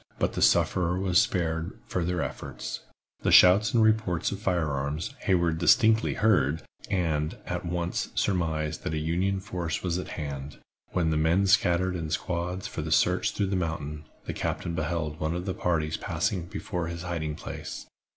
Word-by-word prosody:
But - - 0
the - - -3
sufferer 90 0 +3
was 95 -2 +3
spared 85 0 -1
further 90 -1 -1
efforts. - - -5 0.4
The - - +1
shouts 100 +4 +7
and 115 -2 +4
reports 110 -6 +2
of 100 - -4
fire 90 -7 0
arms 70 +3 -3
Hayward 85 -3 +2
distinctly 110 +5 +4
heard, 80 -9 +2 0.3
and 80 -6 0
at - - -3
once 85 0 -2
surmised 80 -5 0
that 80 - -2
a - - -1
Union 90 +5 0
force 90 -5 -4
was 90 -1 0
at - - -5
hand. 70 -2 -5 0.4
When 85 -3 +1
the 80 - +1
men 85 +5 +3
scattered 95 -2 +3
in 80 -3 -3
squads 90 +3 -2
for - - -4
the - - -4
search - - +3
through 100 - 0
the 95 0 -1
mountain, 75 -4 -3 0.2
the - - -3
captain 85 - -3
beheld 80 -1 -2
one 80 +2 -1
of 90 +1 -4
the 95 - -1
parties 80 -4 0
passing 90 +1 -2
before 85 -1 -4
his 85 +1 -5
hiding 80 -4 -3
place. - - -7
85 Hz, 170 wpm, -27 LUFS, 80-95 Hz, 0.4 s, shouts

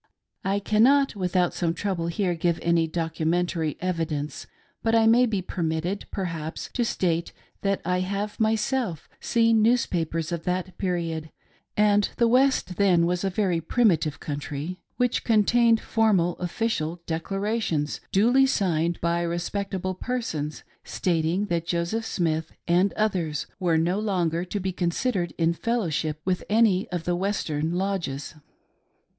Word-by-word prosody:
I 195 +1 +1
.cannot 245 +7 +3
without 180 -2 +1
some 170 -2 -1
trouble 185 -5 -2
give 170 - -4 0.2
here 170 0 +1
any 170 -1 +3
documentary 165 0 -1
evidence, 165 -5 -3 0.3
but 225 0 +2
I 225 -1 +5
may 240 +3 +5
be 205 -5 -1
permitted, 170 +2 -2
perhaps, 165 -5 -4
to 245 - +1
state 170 -6 -1 0.3
that 195 -1 0
I 180 0 +1
have 200 +4 -3
myself 220 - 0
seen 230 -1 +3
newspapers 170 -8 +1
of 170 -1 -3
that 180 0 -2
period 165 -4 -2 0.3
— - - -42
and 205 -1 +4
the 235 - +4
West 250 -7 +2
then 180 -4 +4
was 180 +1 0
a 195 - +1
very 180 -3 0
primitive 165 - +2
country 150 +4 -5
— - - -47
which 250 -1 +1
contained 230 +1 +4
formal 200 -8 +2
official 175 -3 -2
declarations 175 -2 -2
duly 245 +7 +4
signed 170 -8 0
by 170 0 +1
respectable 185 +2 -2
persons, 185 -10 -3 0.2
stating 170 +2 0
that 170 -3 -2
Joseph 175 +7 -1
Smith 160 -2 -1 0.2
and 180 +3 +3
others 180 -9 -1
were 175 -4 +2
no 175 +5 +1
longer 175 -5 0
to 200 +3 -3
be 190 -1 -2
considered 175 +1 -1
in 165 0 +2
fellowship 165 -8 -1
with 180 -1 0
any 210 -3 +3
of 175 -3 -3
the 175 0 0
Western 170 -5 -1
lodges. 180 -7 -2
180 Hz, 140 wpm, -25 LUFS, 165-210 Hz, 0.3 s, I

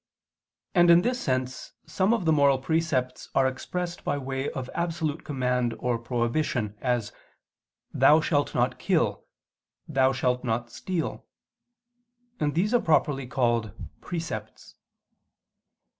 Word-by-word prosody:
And 175 -2 +5
in 170 +1 +7
this 245 +2 0
sense 130 -1 -2
some 190 +3 +1
of 230 -7 +1
the 160 - +4
moral 140 -2 +4
precepts 130 -3 -1
are 135 - +4
expressed 175 +7 -3
by - - -1
way 135 0 -3
of 130 -2 -5
absolute 165 -3 -2
command 125 -4 -1
or 120 0 -1
prohibition, 120 -2 -1
as 120 -4 0 0.8
"Thou 155 +2 +6
shalt 145 -2 0
not - - +1
kill," - - 0 0.6
"Thou 135 -3 +3
shalt 125 -1 0
not 120 0 -2
steal": 180 +2 -4 1.1
and 145 0 0
these 205 +7 +1
are 245 - +4
properly 140 -4 +1
called 120 -5 0 0.3
"precepts." 160 -11 -6
135 Hz, 125 wpm, -26 LUFS, 125-165 Hz, 1.1 s, in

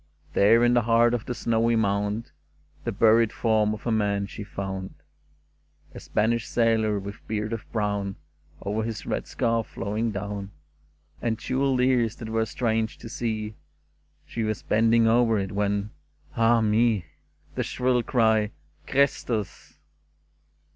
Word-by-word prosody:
There, 115 +4 +5
in 120 0 +4
the 120 - +4
heart 115 +1 +3
of 120 -2 -2
the 125 - -3
snowy 115 0 +1
mound. 105 +1 0 0.5
The - - 0
buried 115 0 +4
form 110 -2 +1
of 105 - -13
a 120 - 0
man 100 -2 +1
she 100 +2 -8
found 95 -1 -5 0.5
— - - -35
A - - -8
Spanish 115 +2 0
sailor, 110 -3 +2
with 100 +1 -8
beard 110 +1 -2
of 115 - -7
brown 100 -3 -1 0.5
Over 105 +2 -1
his 110 -1 -4
red - - -3
scarf 115 -1 0
flowing 110 +3 -2
down. 100 -1 -5 0.7
And 115 -2 0
jewelled 130 +1 0
ears 125 -4 +2
that 110 -2 -8
were 110 0 0
strange 110 -1 -1
to 115 - -10
see. 110 -2 -3 0.7
She 115 - -5
was 110 -1 -2
bending 115 +1 +3
over 115 -1 +4
it, 95 -1 -2
when 100 +1 -1 0.2
— - - -30
ah 115 0 +4
me! 110 -3 +2 0.5
The - - -2
shrill 125 -1 +1
cry, 110 -3 +2 0.4
"Christus! 125 -6 -1
110 Hz, 145 wpm, -26 LUFS, 105-115 Hz, 0.7 s, There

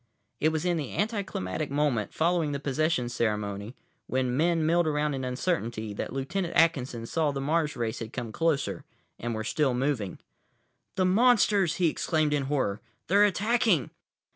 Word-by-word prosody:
It 155 - +3
was 160 +1 -2
in 175 -1 +2
the 145 -5 -4
anticlimactic 190 - -2
moment, 140 -6 0
following 165 -2 +1
the 140 - -2
possession 145 -1 0
ceremony, 105 -1 -2 0.3
when 130 -1 0
men 165 +2 +2
milled 170 +1 +3
around 150 -1 0
in 135 -1 -3
uncertainty, 120 - -2
that - - -4
Lt. 135 +7 -4
Atkinson 165 -10 +1
saw 155 +5 0
the 140 -1 -3
Mars 150 +2 0
race 115 -2 -2
had 115 -1 -6
come 120 -4 -5
closer 160 +2 0 0.4
and 120 -1 -3
were 110 - -3
still 130 +2 +1
moving. 125 -7 -1 0.8
"The 185 - +2
monsters!" 205 -4 +4
he 175 -1 +2
exclaimed 155 -1 0
in 140 -2 0
horror. 130 -8 -1 0.3
"They're 200 +3 +6
attacking!" 210 - +2
150 Hz, 160 wpm, -28 LUFS, 125-170 Hz, 0.8 s, They're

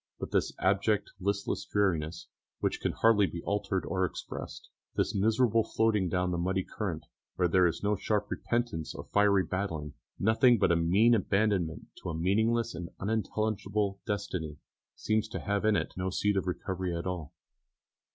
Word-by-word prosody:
But - - -5
this - - +1
abject, 100 +2 +1
listless 100 +1 -1
dreariness, 85 -5 0 0.3
which - - -1
can - - 0
hardly 110 -3 +4
be 85 -1 -6
altered 100 -2 -1
or 95 -1 0
expressed, 90 - -5 0.3
this - - 0
miserable 110 +2 +3
floating 105 -5 +1
down 90 0 0
the 85 - -1
muddy 95 +2 0
current, - - -4 0.3
where 90 - +2
there 90 +1 +4
is 85 - -3
no 105 +1 +2
sharp 105 +1 -1
repentance 120 -9 -2
or - - -6
fiery 100 -2 +4
battling, 85 -7 -3 0.2
nothing 115 +4 +4
but 95 - +3
a - - +4
mean 95 +8 +4
abandonment 100 -5 +1
to - - -4
a 80 - -3
meaningless 110 +7 +1
and 85 0 -6
unintelligible 105 -1 -1
destiny, 90 -7 -3 0.4
seems 110 0 0
to - - -5
have 100 0 -1
in 110 -1 +4
it - - -1
no 90 0 -2
seed 105 +2 +1
of 95 -1 0
recovery 90 -1 -2
at 85 - -5
all. 90 -5 -4
100 Hz, 165 wpm, -30 LUFS, 90-105 Hz, 0.4 s, hardly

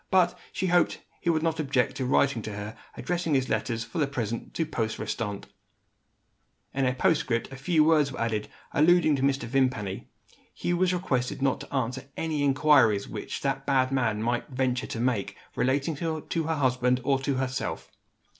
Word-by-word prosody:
But, 180 -2 +4 0.2
she 190 - -2
hoped 175 -1 +3
that - - -13 0.2
he 170 - 0
would 160 -1 +2
not 165 -1 0
object 135 -3 +1
to 130 -2 -1
write 135 +2 +4
to 110 -5 -5
her, 105 +2 -6 0.2
addressing 175 -4 -1
his 130 -1 +1
letters, 115 -3 -1
for 170 - -5
the 145 - +2
present, 120 -5 -4
to 165 - 0
post 115 -8 -2
restante. 105 -4 -3 1.3
In 135 -1 +1
a 125 - +1
postscript 125 -4 +1
a - - -7
few 155 +4 +2
words 150 -3 +4
were - - -7
added, 110 -2 -1 0.2
alluding 155 0 +4
to - - -3
Mr. 135 -1 +1
Vimpany. 115 -6 -1 0.5
Hugh 175 0 -1
was 185 0 +3
requested 135 -8 -1
not 135 - +2
to - - -10
answer 130 0 -2
any 155 -3 -1
inquiries 135 -7 +4
which - - -5
that 135 0 -2
bad 130 -2 +3
man 115 -5 0
might 120 +4 -1
venture 130 -1 -1
to 115 - -5
make, 120 -4 -1 0.2
relating 140 +5 +1
to 160 +1 -2
her 160 0 0
husband 125 -2 +2
or 135 0 +2
to 135 0 -1
herself. 130 0 -3
135 Hz, 185 wpm, -27 LUFS, 125-155 Hz, 1.3 s, But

